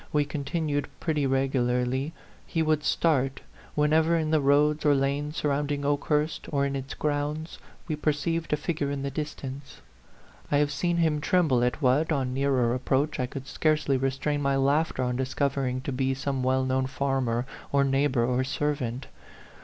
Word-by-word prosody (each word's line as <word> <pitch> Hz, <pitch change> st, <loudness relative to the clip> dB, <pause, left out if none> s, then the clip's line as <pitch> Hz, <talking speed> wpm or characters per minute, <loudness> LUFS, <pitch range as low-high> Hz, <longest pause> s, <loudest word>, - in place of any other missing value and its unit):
107 -, -, -1 dB
we 145 Hz, -, +2 dB
continued 145 Hz, +1 st, -2 dB
pretty 150 Hz, -4 st, 0 dB
regularly, 130 Hz, +1 st, 0 dB, 0.4 s
he 165 Hz, -, 0 dB
would 155 Hz, -1 st, +1 dB
start 135 Hz, -5 st, +1 dB, 0.3 s
whenever 155 Hz, +3 st, +3 dB
in 155 Hz, -1 st, -1 dB
the 155 Hz, -2 st, +3 dB
roads 145 Hz, +2 st, +3 dB
or 145 Hz, -1 st, +4 dB
lanes 140 Hz, +3 st, -1 dB
sur 150 Hz, -, 0 dB
rounding 145 Hz, 0 st, -1 dB
Okehurst, 150 Hz, +2 st, 0 dB
or 140 Hz, -2 st, +1 dB
in 140 Hz, 0 st, -2 dB
its 135 Hz, 0 st, -5 dB
grounds, 150 Hz, +2 st, -2 dB, 0.3 s
we 155 Hz, -, -1 dB
perceived 160 Hz, +2 st, -1 dB
a 150 Hz, -, +2 dB
figure 150 Hz, -2 st, -2 dB
in 140 Hz, -1 st, -3 dB
the 140 Hz, -, -2 dB
distance. 140 Hz, -2 st, -6 dB, 0.7 s
I 145 Hz, -, +4 dB
have 145 Hz, 0 st, +2 dB
seen 175 Hz, +3 st, 0 dB
him 160 Hz, -3 st, +2 dB
tremble 150 Hz, -8 st, +2 dB
at 125 Hz, +5 st, -1 dB
what, 140 Hz, +6 st, +3 dB
on 130 Hz, -4 st, 0 dB
Dearer 130 Hz, -3 st, +2 dB
ap 130 Hz, +1 st, -4 dB
proach, 145 Hz, +3 st, +1 dB
I 125 Hz, -, 0 dB
could 135 Hz, +1 st, -7 dB
scarcely 155 Hz, -1 st, +1 dB
restrain 135 Hz, +3 st, -1 dB
my 140 Hz, -1 st, +1 dB
laughter 140 Hz, +1 st, +1 dB
on 125 Hz, 0 st, -1 dB
discovering 130 Hz, -1 st, -1 dB
to 140 Hz, +1 st, -4 dB
be 130 Hz, +1 st, 0 dB
some 135 Hz, 0 st, -2 dB
well 130 Hz, +1 st, +1 dB
known 130 Hz, 0 st, 0 dB
farm 135 Hz, -2 st, -1 dB
er 120 Hz, +2 st, 0 dB, 0.3 s
or 140 Hz, 0 st, +3 dB
neighbor 135 Hz, -3 st, +2 dB
or 125 Hz, +1 st, +1 dB
servant. 135 Hz, -2 st, -2 dB
140 Hz, 175 wpm, -27 LUFS, 130-150 Hz, 0.7 s, or